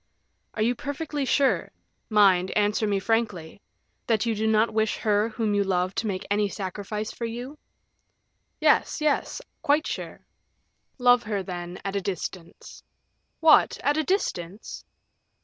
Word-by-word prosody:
"Are 215 - 0
you 240 +2 +2
perfectly 285 +2 -4
sure 275 +2 +2 0.4
mind, 195 -4 +4
answer 210 +1 +1
me 200 -1 +1
frankly 200 -5 -2 0.5
that 225 0 +2
you 230 - +1
do 220 +1 -1
not 220 +1 +2
wish 220 0 +1
her 210 +1 +1
whom 220 -2 -1
you 205 0 +2
love 185 -1 0
to 225 - -2
make 190 -2 -3
any 205 0 +2
sacrifice 205 +2 -5
for 235 - -5
you?" 245 +6 -6 1.0
"Yes, - - +3
yes; 305 -1 0 0.2
quite 295 +2 +2
sure." - - -6 0.7
"Love 245 -1 +5
her, 205 -3 -3
then, 175 -1 -6
at 195 0 -3
a 200 - 0
distance." 180 -2 -6 0.6
"What! 320 -1 +5
at 290 +1 +2
a 315 - +1
distance?" 205 - -3
215 Hz, 145 wpm, -26 LUFS, 195-245 Hz, 1.0 s, Love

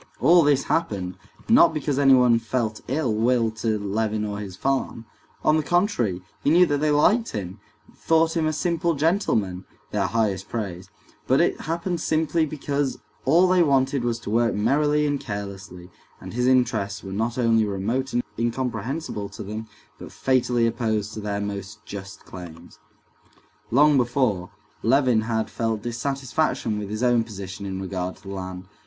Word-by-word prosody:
All 170 +6 +6
this 145 -3 +3
happened, 95 - -1 0.3
not 170 -8 +6
because 145 -2 -1
anyone 125 -4 +5
felt 115 -2 -2
ill 135 -3 0
will 115 +1 +2
to 110 0 -1
Levin 105 +1 -1
or 105 -1 -4
his 100 -3 -7
farm; 130 -1 -2 0.4
on 155 - +4
the - - +2
contrary, 145 - 0 0.2
he - - +3
knew 175 +4 +6
that 145 -4 0
they 155 +1 +1
liked 210 +11 +3
him, 95 -1 -5 0.4
thought 165 0 +2
him 160 -2 +1
a - - +1
simple 170 +1 0
gentleman 135 - 0 0.3
(their - - 0
highest 105 -4 -1
praise); 95 -4 -5 0.4
but 130 - +4
it 170 - +1
happened 170 +1 -2
simply 160 0 +1
because 145 -2 -2 0.3
all 170 +7 +5
they 180 0 +4
wanted 135 -3 +2
was 120 -1 0
to - - -5
work 115 +1 +2
merrily 150 +7 +2
and 145 -1 0
carelessly, 100 -4 -7 0.3
and - - -9
his 125 +1 +1
interests 115 -6 +1
were 95 -1 -6
not 115 +4 -2
only 115 -2 +3
remote 110 +7 -2
and 120 - 0 0.2
incomprehensible 120 -1 -3
to - - -8
them, 110 +2 -6 0.3
but - - -9
fatally 125 -2 +1
opposed 110 -3 -1
to - - -6
their 100 -1 -3
most 100 0 -5
just 100 -2 -9
claims. 85 -2 -11 0.9
Long 145 +4 +5
before, 120 -7 +1 0.3
Levin 125 -1 +3
had 110 0 -1
felt 115 -2 -2
dissatisfaction 130 -2 -1
with 100 -1 -5
his 110 +3 -3
own 120 -2 +3
position 100 -2 -7
in 95 -1 -4
regard 95 -1 -4
to - - -22
the 95 - -9
land. 95 -1 -6
115 Hz, 165 wpm, -24 LUFS, 105-145 Hz, 0.9 s, All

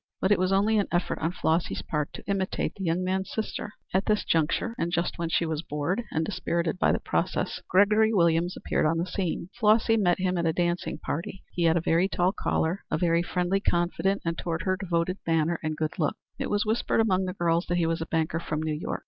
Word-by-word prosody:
But 190 - +1
it 205 - +4
was 185 +1 +1
only 210 +3 +3
an 200 - 0
effort 175 0 0
on 160 +2 0
Flossy's 165 -1 0
part 150 -2 -2
to - - -9
imitate 195 -1 -1
the 195 - -7
young 175 +1 0
man's 190 +1 -1
sister. 215 -1 -4 0.2
At 190 +1 +1
this 210 -1 +1
juncture 165 +8 +1
and 170 - -1
just 175 0 -1
when 170 -1 -1
she 170 - +1
was 160 -1 -2
bored 160 +7 -2
and 160 0 0
dispirited 170 -2 -1
by - - +4
the - - +2
process, - - -1
Gregory 210 +3 +4
Williams 170 -2 +2
appeared - - 0
on 165 +1 +1
the 170 - 0
scene. 180 -2 -3
Flossy 225 +1 +4
met 175 -5 +3
him 185 -1 0
at 170 - +1
a 160 - +2
dancing 175 +1 -1
party. 170 +5 -5
He 175 - 0
had 165 +1 +4
a - - +1
very 170 +3 +2
tall 180 -1 +1
collar, 175 -2 -1
a - - 0
very 170 -1 +2
friendly, 180 +2 0
confident, 190 +2 0
and 165 -1 -2
(toward 165 +1 -2
her) 185 -1 +1
devoted 180 0 -1
manner, 165 +1 +1
and 155 -1 -3
good 155 +4 -3
looks. 150 - 0 0.2
It - - -2
was 205 +1 +1
whispered 220 +1 +1
among 190 -4 +2
the 185 - -3
girls 170 -1 +1
that 175 - 0
he 170 - +2
was 165 0 -1
a 165 - -3
banker 165 0 0
from 155 -2 -3
New 155 -1 -1
York. 150 - -3
175 Hz, 235 wpm, -27 LUFS, 165-190 Hz, 0.2 s, it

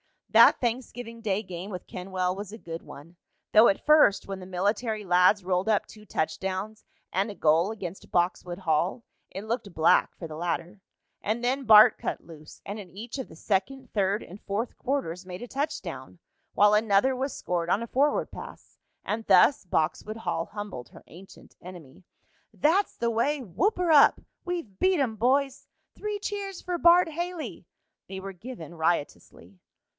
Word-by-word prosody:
That - - +7
Thanksgiving 240 -1 -4
Day 210 -1 -1
game 185 0 -7
with 180 -3 -7
Kenwell 185 0 -3
was 200 +1 -7
a - - -7
good 165 -5 -7
one, 165 +5 -13 0.3
though 220 +2 +7
at 195 - 0
first, 300 -10 +5
when 195 -1 -5
the 185 - -9
military 210 +4 -1
lads 180 +2 +4
rolled 180 +1 0
up 210 -2 +2
two 215 -1 -15
touchdowns 190 +6 -3 0.3
and 195 +4 0
a 205 - -7
goal 165 +4 +3
against 195 -4 -7
Boxwood 175 0 -1
Hall, 175 +5 0 0.3
it 195 - -7
looked 220 -2 -3
black 160 +1 +3
for 165 - -7
the 155 -1 -8
latter. 175 +3 -3 0.4
And 225 +4 -2
then 265 +2 0
Bart 220 +1 +8
cut - - -3
loose, 155 -2 -13
and 205 +2 -5
in 195 -3 -10
each 230 +8 -8
of 260 - -5
the - - -14
second, 225 +9 -2
third 200 0 0
and 190 +4 -12
fourth 210 +4 -3
quarters 195 -10 -3
made 180 0 -8
a 245 - -9
touchdown, 295 +2 -5 0.4
while 205 +1 +5
another 210 +4 +3
was 265 +1 -3
scored 170 -1 -2
on 210 +5 +1
a - - -6
forward 285 +5 +1
pass, - - -11 0.2
and 220 +1 -3
thus 195 +5 +5
Boxwood 185 +6 -1
Hall 195 -7 -2
humbled 205 - -7
her - - -15
ancient 185 +4 -15
enemy. 175 -4 -12 0.5
"That's 360 +7 +2
the 235 0 -1
way!" 275 +6 0
"Whoop 275 - 0
her 355 -2 +1
up!" 290 -2 +6 0.3
"We've 335 - -5
beat 375 -3 +3
'em, 235 -6 -1
boys!" 270 +4 +1 0.3
"Three 420 -1 -4
cheers 400 -2 -5
for 360 -1 -3
Bart 345 0 +5
Haley!" 320 - -5 0.4
They 190 0 -7
were 195 0 -7
given 180 - -9
riotously. 145 - -3
205 Hz, 170 wpm, -27 LUFS, 180-250 Hz, 0.5 s, Bart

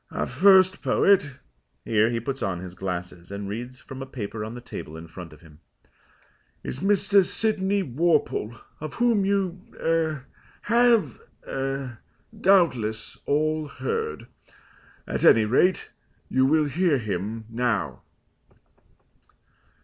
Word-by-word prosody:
Our - - -2
first 185 -1 +5
poet" 185 -9 +3 0.5
here 110 0 +3
he 115 -1 -1
puts 135 +3 -4
on 95 -3 -2
his 90 0 -8
glasses, 90 -1 -5
and 100 0 -5
reads 120 +5 -6
from 135 0 -9
a 135 - -6
paper 110 -4 -5
on 110 +2 -6
the - - -7
table 80 -9 -8
in 80 +1 -10
front 85 +1 -10
of 75 - -16
him 80 -2 -17 1.0
"is 130 - -5
Mr. 200 +1 +3
Sydney 200 0 0
Worple, 145 -6 0 0.2
of 155 -1 -7
whom 235 -5 +2
you 195 -2 0
er 160 -4 -1 0.4
have 235 -2 +3 0.3
er 135 -3 -4 0.4
doubtless 165 - +1
all 155 +1 +1
heard. 450 - -4 0.8
At - - -3
any 110 -1 +6
rate 165 - +2 0.4
you 130 0 +3
will 155 +1 +3
hear 160 +1 +1
him 110 0 -4
now." 115 -3 -2
135 Hz, 125 wpm, -25 LUFS, -, 1.0 s, any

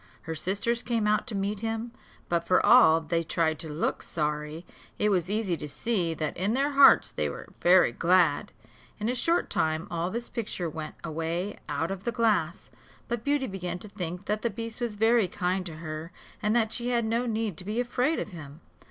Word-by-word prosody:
Her 165 - -4
sisters 205 +8 0
came 230 -3 -1
out 210 0 +2
to 225 - -4
meet 200 +1 -1
him, 225 +1 -3 0.4
but 170 -1 0
for 185 - +4
all 165 -10 +7
they 165 +1 0
tried 160 -1 0
to 160 - -4
look 150 +3 -1
sorry, 150 +1 -3 0.3
it 210 - +2
was 185 -3 +1
easy 205 -4 0
to 150 - -7
see 175 0 -1
that 155 -1 -3
in 200 +6 0
their 280 +2 +1
hearts 280 -1 +7
they - - -1
were - - -8
very 180 -6 +6
glad. 175 - +2 0.5
In 215 +2 -1
a - - +1
short 330 +7 +1
time 160 +3 0
all 170 +1 -1
this 235 +4 -4
picture 205 -7 -3
went 155 -1 -6
away 165 +5 -3
out 155 +5 -1
of 195 -1 -5
the 235 - -1
glass: 210 -7 0 0.4
but 235 -1 -3
Beauty 285 -1 +1
began 180 -5 -4
to 195 - -9
think 180 -1 -5
that 210 +1 -1
the 235 - 0
beast 230 +3 -6
was 235 -3 -2
very 225 -1 +3
kind 185 0 -1
to 165 - -7
her, 155 +1 -6 0.3
and 215 +1 +1
that 225 -2 +2
she 240 +1 -2
had 235 -2 +1
no 230 +2 0
need 220 -4 -1
to - - -5
be 210 +5 -2
afraid 250 +5 +1
of - - -3
him. 155 -4 -10
195 Hz, 205 wpm, -28 LUFS, 165-230 Hz, 0.5 s, all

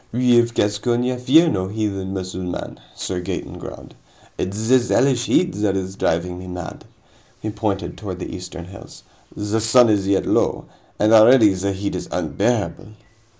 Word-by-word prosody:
"We 125 0 +4
of 120 0 0
Gascony 120 +5 0
fear 140 +7 +5
no 95 -12 -1
heathen 100 -2 -3
Musselman," 95 -1 -5 0.2
Sir 90 -1 -4
Gaeton 90 0 -5
growled. - - -10 0.4
"It's 105 +4 -3
this 125 -1 +3
Hellish 130 -3 +2
heat 180 -1 +2
that 100 -2 0
is 95 0 -4
driving 90 -1 -1
me 90 - -9
mad." 90 -3 -7 0.5
He 110 - -4
pointed 105 -2 -3
toward 95 -4 -6
the 90 - -6
eastern 90 -1 -8
hills. 95 +2 -13 0.3
"The 105 +2 -1
sun 115 +2 +5
is 100 -2 +1
yet 100 -1 +1
low, - - +1 0.3
and 105 +2 +3
already 110 -1 +7
the 95 +1 -2
heat 100 +1 -3
is - - -5
unbearable." 120 -1 -1
105 Hz, 160 wpm, -21 LUFS, 95-120 Hz, 0.5 s, already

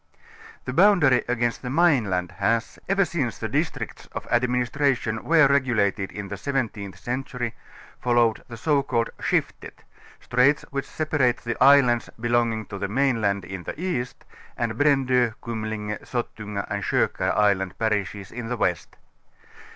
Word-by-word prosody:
The 130 - -4
boundary 170 -8 +5
against 120 -1 -1
the 125 - -5
main 145 -7 +3
land 90 -1 -1
has, 115 0 0
ever 195 0 +3
since 155 - -2
the - - -3
districts - - -3
of - - -5
' - - -12
administration 125 -1 +1
were 160 -2 +5
regulated 115 -8 +1
in 105 -1 -6
the 100 +1 -6
seventeenth 105 -7 -3
century, 125 -1 -4 0.5
followed 120 -2 +2
the 115 - -9
so 145 +4 +2
called 115 -4 -1
,.Skiftet", - - -2 0.4
straits 125 +4 +2
which 140 -1 -3
separate 145 -6 +1
the 120 -1 -2
islands 130 -4 +5
belonging 115 -2 +1
to 100 +1 -8
the - - -2
mainland 110 -5 +1
in 95 -1 -6
the 115 - -7
ea, 175 -9 -1
st 125 - -20 0.3
and 115 -2 -1
Brando. 130 -3 +2
Kumlinge, 110 -2 -4
Sottunga 105 -4 -4
and - - -3
Kokar - - 0
island 100 -3 +2
parishes 105 -3 -2
in 120 -1 -6
the 125 - -2
west. 90 -5 -1
120 Hz, 150 wpm, -24 LUFS, 105-135 Hz, 0.5 s, boundary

